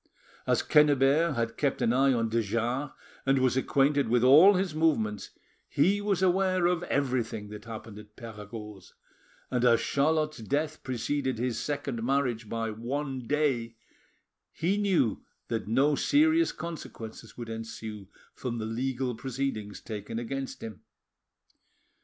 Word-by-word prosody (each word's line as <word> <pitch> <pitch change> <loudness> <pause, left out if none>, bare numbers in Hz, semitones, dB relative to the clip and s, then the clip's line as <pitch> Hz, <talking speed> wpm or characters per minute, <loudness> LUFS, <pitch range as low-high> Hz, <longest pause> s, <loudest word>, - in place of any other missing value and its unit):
As - - +2
Quennebert 150 +1 +4
had 115 0 -2
kept 140 -2 0
an 115 - +2
eye 135 +2 +4
on 115 -3 +1
de 115 +1 +1
Jars 115 +6 -1 0.3
and 135 0 +3
was 130 -1 +2
acquainted 140 0 +2
with 120 0 +3
all 155 +10 +8
his 185 -3 0
movements, 115 -11 0 0.4
he 190 +8 +2
was 200 -3 0
aware 185 -1 +2
of 175 -1 +2
everything 120 -6 -1
that 105 0 -9
happened 110 -2 -8
at 105 0 -15
Perregaud's, 105 -3 -10 0.6
and 125 -1 0
as 120 -2 +5
Charlotte's 155 0 +1
death 150 +7 -2
preceded 130 +1 -2
his 120 -1 -1
second 140 -5 -3
marriage 125 -4 0
by 115 -1 -2
one 130 +3 -4
day, 130 -6 0 0.8
he 185 +5 0
knew 180 - +1 0.3
that 110 -3 -2
no 135 +7 +3
serious 315 - +3
consequences 115 -9 -8
would 120 -2 -6
ensue 110 -2 -7 0.3
from 120 -2 -4
the 110 - -3
legal 125 +2 -2
proceedings 115 -4 -4
taken 110 +1 -6
against 135 +3 -5
him. 110 -3 -8
130 Hz, 140 wpm, -28 LUFS, 115-150 Hz, 0.8 s, all